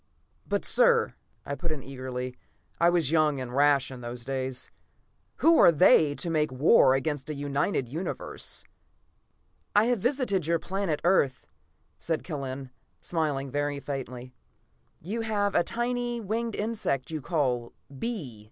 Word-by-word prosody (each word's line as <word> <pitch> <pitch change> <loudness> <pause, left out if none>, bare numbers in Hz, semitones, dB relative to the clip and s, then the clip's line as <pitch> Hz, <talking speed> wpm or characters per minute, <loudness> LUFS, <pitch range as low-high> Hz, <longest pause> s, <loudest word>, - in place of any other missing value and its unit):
"But, - - -1
sir!" - - +4 0.3
I 140 - -3
put 170 +3 -3
in 145 -4 -4
eagerly. 130 -1 -5 0.4
I 170 - +5
was 170 -5 +1
young 155 -3 +3
and 125 -1 -5
rash 140 -1 +3
in 130 -1 -8
those 120 0 -6
days. 130 -1 -3 0.6
"Who 330 0 +5
are - - +8
they, 150 -2 +5
to 170 - -2
make 155 -2 +1
war 130 - +5
against 140 +1 -2
a 150 - -3
united 140 0 -1
Universe?" 160 +9 -4 1.1
"I 210 +2 +6
have 245 -2 +1
visited 200 - 0
your 170 0 +3
planet, 185 -3 -2
Earth," 170 -7 +2 0.5
said 160 -2 -2
Kellen, 135 -4 -5 0.3
smiling 145 -5 -1
very 145 0 -1
faintly. 130 -3 -6 0.7
"You 210 +8 -3
have 205 -2 0
a - - +4
tiny 240 +1 -2
winged 225 +1 -2
insect 205 - -2
you 155 -2 -3
call 130 -7 -1 0.3
bee. 160 - -4
150 Hz, 145 wpm, -28 LUFS, 135-195 Hz, 1.1 s, are